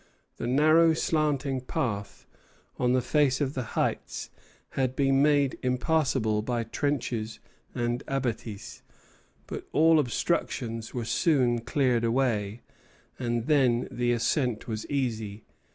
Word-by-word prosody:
The - - -3
narrow 155 +5 +5
slanting 145 -5 0
path 100 -5 -3 0.5
on 125 0 +2
the 130 -1 +2
face 140 0 +2
of 140 -2 -1
the 130 - -2 0.2
heights - - -2 0.4
had 130 -1 -1
been 135 0 +3
made 145 -2 +3
impassable 125 -4 +1
by 120 +1 -1
trenches 115 -3 -2 0.4
and 120 +2 -1
abattis; 120 -6 -4 0.6
but - - -7
all 160 +1 +5
obstructions 120 -4 -1
were 120 -2 -4
soon 125 -4 +2
cleared 120 -1 +1
away, 115 -3 0 0.6
and 120 -2 -1
then 130 -5 +3
the 120 0 0
ascent 120 0 0
was 110 -2 -4
easy. 110 -7 -3
125 Hz, 120 wpm, -27 LUFS, 115-140 Hz, 0.6 s, narrow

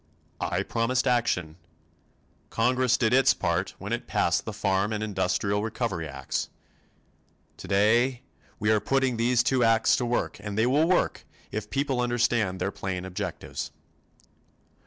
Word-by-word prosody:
I - - -1
promised 120 +3 0
action. 90 -10 0 0.9
Congress 125 +1 +2
did 110 -1 +1
its 135 0 +5
part - - -1
when - - -5
it - - -3
passed - - +1
the - - -4
Farm 100 0 0
and 110 0 -2
the - - 0
Industrial 100 0 0
Recovery 110 -7 -3
Acts. 70 -2 -4 1.1
Today 120 +6 +2 0.3
we 105 +1 +1
are 110 - +4
putting 130 +2 +1
these 120 +1 +3
two 125 0 +2
acts 115 0 +4
to 125 - -1
work 120 - -1
and 100 0 -6
they 110 - +3
will 145 +6 +3
work 180 0 +1 0.3
if 105 -1 -4
people 135 -2 0
understand 120 -6 +1
their 100 - -1
plain 95 -2 -4
objectives. 95 +3 -5
115 Hz, 145 wpm, -27 LUFS, 100-125 Hz, 1.1 s, its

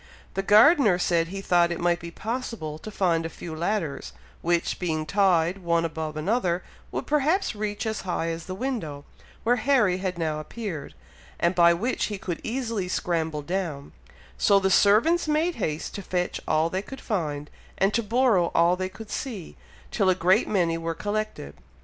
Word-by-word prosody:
The 195 - -1
gardener 215 - +6
said 170 -2 +1
he 195 +3 -6
thought 175 -2 +3
it 170 - -3
might 175 -1 +1
be 170 - -7
possible 215 -7 -5
to 215 - -8
find 175 -5 +1
a 165 - -3
few 165 -1 -8
ladders, 170 -3 -2 0.3
which, 170 0 0
being 160 -3 -1
tied 185 -1 +2
one 170 -2 +1
above 160 -1 -4
another, 180 0 0 0.3
would - - -3
perhaps 300 +6 +1
reach 210 0 -3
as 220 -1 -2
high 175 -3 -2
as 165 0 -5
the 185 - -4
window, 190 - -4 0.4
where 245 +2 +3
Harry 220 -7 +3
had 185 -2 -3
now 155 -2 -1
appeared, 160 - -6 0.4
and 170 +1 +2
by 170 -1 +5
which 235 +9 -1
he 210 - -4
could 180 -3 -5
easily 230 -5 -2
scramble 160 -4 -1
down; 165 - -3 0.5
so 200 -1 +5
the 190 0 +1
servants 230 - +4
made 310 +3 +1
haste 155 -7 -3
to 200 - -5
fetch 180 -1 -2
all 155 +1 +2
they 190 - -1
could 270 +6 -9
find, 150 - -3 0.3
and 195 +2 +2
to 235 - +2
borrow 225 -5 +3
all 170 +1 +4
they 185 0 -3
could 205 +3 -11
see, 215 - -5 0.4
till 195 -4 +2
a 185 - +4
great 185 +5 +3
many 170 -5 +1
were 165 0 -3
collected. 210 - -3
185 Hz, 180 wpm, -26 LUFS, 165-215 Hz, 0.5 s, gardener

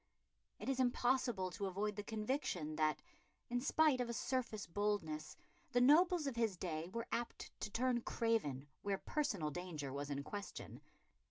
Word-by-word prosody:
It - - -7
is 270 -1 +1
impossible 245 -6 +2
to 200 +2 -2
avoid 205 +3 -1
the 205 - -3
conviction 210 - -1
that, 155 -1 +2 0.5
in 245 0 +1
spite 290 -1 +4
of 240 - -1
a - - -1
surface 235 -4 -1
boldness, 165 -6 -1 0.4
the 245 - +5
nobles 320 +5 +6
of 275 -4 -1
his 225 -5 +1
day 165 -2 -3
were 230 +3 -3
apt 240 0 -3
to - - -3
turn 245 +3 +1
craven 195 - 0
where 200 -1 0
personal 200 - -1
danger 155 -5 -4
was 140 +1 -3
in 140 -1 -2
question. 205 +5 -6
210 Hz, 160 wpm, -39 LUFS, 165-245 Hz, 0.5 s, nobles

